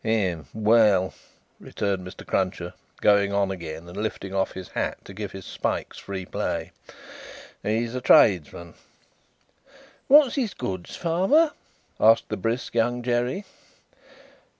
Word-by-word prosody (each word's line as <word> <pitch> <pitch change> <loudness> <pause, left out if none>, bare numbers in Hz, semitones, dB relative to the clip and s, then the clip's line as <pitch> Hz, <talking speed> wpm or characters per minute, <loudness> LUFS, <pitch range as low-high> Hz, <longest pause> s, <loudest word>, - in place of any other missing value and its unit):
"Hem! 95 -8 0
Well," 105 -4 +3 0.5
returned 95 -3 -3
Mr. 90 - -11
Cruncher, 90 -2 -1 0.3
going 100 -1 +4
on 100 -1 +1
again, 85 -2 -7
and 90 - -10
lifting 100 -2 -4
off 95 0 0
his 95 -2 -8
hat - - -3
to 95 - -10
give 105 0 -6
his 95 -1 -9
spikes - - -3
free 95 -2 -6
play, - - -3 0.9
"he's 115 +2 -1
a 125 - -3
tradesman." 85 -6 +4 1.3
"What's 285 -2 +7
his 245 -8 -2
goods, 95 -7 -5
father?" 190 - +3 0.5
asked 115 +1 +5
the 110 - -2
brisk 115 +5 -2
Young 120 +1 +1
Jerry. 125 - -1
105 Hz, 125 wpm, -25 LUFS, 95-120 Hz, 1.3 s, What's